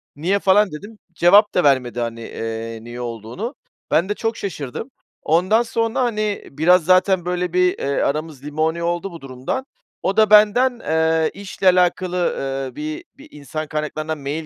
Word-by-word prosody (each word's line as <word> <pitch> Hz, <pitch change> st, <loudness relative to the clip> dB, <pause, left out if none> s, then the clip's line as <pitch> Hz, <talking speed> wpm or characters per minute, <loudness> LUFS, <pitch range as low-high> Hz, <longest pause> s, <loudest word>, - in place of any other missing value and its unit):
"Niye?" 180 Hz, +7 st, 0 dB
falan 195 Hz, 0 st, +3 dB
dedim. 205 Hz, +9 st, -9 dB, 0.2 s
Cevap 200 Hz, +5 st, +5 dB
da 180 Hz, -, +2 dB
vermedi, 130 Hz, -4 st, +2 dB
hani, 115 Hz, -1 st, -3 dB
eee, 115 Hz, 0 st, -5 dB
niye 120 Hz, +1 st, -8 dB
olduğunu. 120 Hz, -, -6 dB, 0.4 s
Ben 175 Hz, +5 st, +2 dB
de -, -, +1 dB
çok 225 Hz, +1 st, -2 dB
şaşırdım. 160 Hz, -, -5 dB, 0.3 s
Ondan 185 Hz, +8 st, +3 dB
sonra, 230 Hz, +1 st, -1 dB
hani, 215 Hz, -4 st, -1 dB
biraz 160 Hz, +4 st, +3 dB
zaten 185 Hz, 0 st, +3 dB
böyle 180 Hz, -1 st, -2 dB
bir, 180 Hz, 0 st, +2 dB
eee, 140 Hz, 0 st, -1 dB
aramız 150 Hz, -1 st, -2 dB
limoni 160 Hz, +3 st, -1 dB
oldu 175 Hz, +3 st, -2 dB
bu 170 Hz, -, -10 dB
durumdan. 135 Hz, -, -4 dB, 0.4 s
O 195 Hz, +2 st, -1 dB
da 215 Hz, -2 st, +5 dB
benden, 225 Hz, +4 st, +5 dB
eee, 160 Hz, -2 st, +1 dB
işle 195 Hz, -1 st, -3 dB
alakalı, 180 Hz, 0 st, +2 dB, 0.2 s
ııı, 135 Hz, -1 st, -4 dB
bir 150 Hz, +1 st, -5 dB
bir 290 Hz, +2 st, -14 dB
insan 155 Hz, +2 st, -6 dB
kaynaklarına 155 Hz, +1 st, -3 dB
mail 150 Hz, +2 st, -5 dB
170 Hz, 160 wpm, -20 LUFS, 145-200 Hz, 0.4 s, Cevap